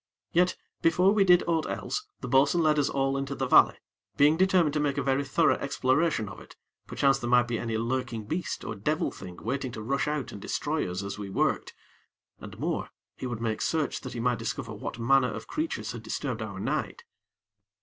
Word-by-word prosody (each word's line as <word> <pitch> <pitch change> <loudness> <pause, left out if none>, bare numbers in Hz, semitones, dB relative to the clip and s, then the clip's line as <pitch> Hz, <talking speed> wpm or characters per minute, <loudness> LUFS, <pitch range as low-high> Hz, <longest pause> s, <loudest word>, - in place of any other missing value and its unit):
Yet, 180 +2 +2 0.2
before 180 +4 +4
we 210 -2 +4
did 180 -2 +6
aught 165 -2 0
else, 420 +1 -3
the - - -5
bo'sun 145 +5 +4
led 155 -1 +3
us 145 - +2
all 135 0 0
into 135 0 -3
the 135 - -1
valley, 125 - +6 0.4
being 145 +2 +6
determined 180 -4 +3
to 150 - 0
make 145 -1 0
a 140 - 0
very 135 +1 +1
thorough 135 - +2
exploration 140 -2 +1
of 100 - -9
it, - - -14 0.3
perchance 135 -1 +2
there 120 - -3
might 120 0 +4
be 115 -2 -2
any 115 -1 -2
lurking 120 -1 -2
beast 165 - -3
or - - -3
devil 150 +10 -1
thing 90 -2 -10
waiting 130 +2 -2
to 110 - -6
rush 140 +5 0
out 150 -4 -2
and 100 - -9
destroy - - -2
us 90 +2 -4
as 100 +1 -5
we 100 -1 -5
worked, 95 - 0 0.6
and - - -10
more, - - -2 0.3
he 130 - -5
would 120 -2 -5
make 110 -2 -1
search 160 -2 0
that 130 - -7
he 120 - -5
might 125 0 +1
discover - - -4
what - - -6
manner 125 +1 +3
of - - -6
creatures 315 - -3
had 120 -2 -7
disturbed 115 +1 -3
our 100 -3 -5
night. - - -2
135 Hz, 210 wpm, -28 LUFS, 115-150 Hz, 0.6 s, did